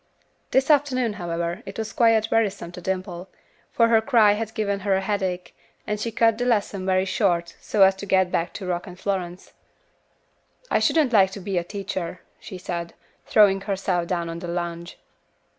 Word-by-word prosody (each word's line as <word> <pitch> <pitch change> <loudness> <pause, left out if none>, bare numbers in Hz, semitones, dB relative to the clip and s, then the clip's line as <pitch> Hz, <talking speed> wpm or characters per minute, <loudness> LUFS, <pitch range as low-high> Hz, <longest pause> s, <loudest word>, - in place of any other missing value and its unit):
This 270 +3 +3
afternoon, 255 -6 +2
however, 170 +2 -3
it - - -8
was 220 -2 -4
quite 225 -2 +3
wearisome 205 -6 0
to 180 - -9
Dimple, 185 0 -4 0.4
for 230 - +3
her 225 -1 +5
cry 220 -4 +5
had 220 +1 -3
given 200 -3 -1
her 200 0 +1
a 190 - 0
headache, 190 -3 -3 0.3
and 210 0 -2
she 230 +2 -3
cut 225 0 +2
the 245 - 0
lesson 205 -5 0
very 185 0 +2
short 175 -3 0
so 205 -2 +3
as 190 0 +6
to 200 - -7
get 190 -2 +2
back 170 - -1
to 195 - -7
Rock 175 0 -3
and 180 0 -11
Florence. 185 -3 -4 1.2
"I - - +3
shouldn't 295 -7 +2
like 195 -3 +6
to 200 - -6
be 190 -1 -1
a - - -4
teacher," 185 -2 -5 0.2
she 185 - -9
said, 170 -2 -5 0.3
throwing 195 -2 +5
herself 190 -3 -1
down 170 -2 -2
on 165 0 -5
the 175 - -7
lounge. 170 0 -5
195 Hz, 185 wpm, -24 LUFS, 180-215 Hz, 1.2 s, as